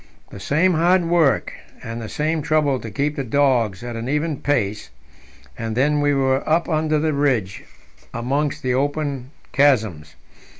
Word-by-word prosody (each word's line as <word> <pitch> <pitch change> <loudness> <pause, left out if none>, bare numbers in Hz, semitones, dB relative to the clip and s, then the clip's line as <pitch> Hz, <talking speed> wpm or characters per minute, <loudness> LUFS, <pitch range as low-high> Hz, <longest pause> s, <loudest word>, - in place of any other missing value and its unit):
The 100 - -9
same 165 - +2
hard 175 +2 +3
work, 165 -4 +2 0.3
and 115 +1 -6
the 110 - -6
same 155 +1 -1
trouble 145 -3 +1
to 115 - -7
keep 145 +8 -2
the 140 - -2
dogs 120 -6 +1
at 120 -1 -5
an 115 +2 -4
even 150 +1 -1
pace, 105 - -1 0.7
and 115 0 -4
then 145 +3 +2
we 145 0 +2
were 135 -1 +1
up 165 +2 +2
under 155 -1 +1
the 155 +1 0
ridge 130 -9 0 0.5
amongst 135 +5 -2
the 130 -1 0
open 140 -1 -2 0.2
chasms. 110 - +1
140 Hz, 160 wpm, -21 LUFS, 115-150 Hz, 0.7 s, hard